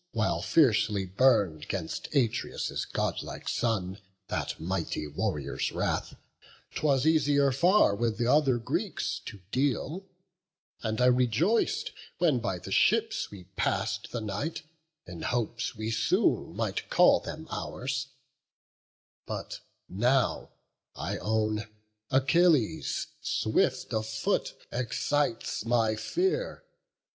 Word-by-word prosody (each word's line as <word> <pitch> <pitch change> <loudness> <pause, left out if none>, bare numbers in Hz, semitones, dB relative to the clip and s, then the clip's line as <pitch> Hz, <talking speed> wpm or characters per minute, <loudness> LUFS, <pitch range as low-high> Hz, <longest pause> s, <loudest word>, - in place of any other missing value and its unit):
While - - 0
fiercely 110 -9 +3
burn'd 95 - +2
'gainst 90 -5 -4
Atreus' 120 -6 0
godlike - - -3
son 100 -4 -1 0.3
That - - -3
mighty 85 -3 -2
warrior's 75 -1 -2
wrath, - - -2 0.6
'twas 140 -3 +1
easier 145 -3 +4
far 175 - +4
With 115 0 -1
th' 120 - 0
other 135 -1 +4
Greeks 115 - -2
to 105 -3 -8
deal; 145 - -1 0.7
and 110 -1 -2
I 125 - +4
rejoic'd 170 - +2 0.3
When 160 -8 +3
by 95 -5 -2
the 85 - -9
ships - - +2
we 100 -3 -11
pass'd - - -1
the 120 - -3
night, 110 +11 -3 0.4
in 90 -2 -9
hopes 120 +2 -2
We 110 +1 -3
soon 110 - +1
might - - -2
call - - +6
them - - -7
ours; 130 +1 -3 1.2
but - - -5 0.3
now, 125 +7 +1 0.5
I - - -3
own 110 0 0 0.4
Achilles, 135 - +2 0.2
swift 130 - 0
of 110 0 -1
foot, 110 0 -1 0.2
excites 125 0 -1
my 115 -1 +2
fear. 380 - -1
120 Hz, 110 wpm, -29 LUFS, 105-140 Hz, 1.2 s, call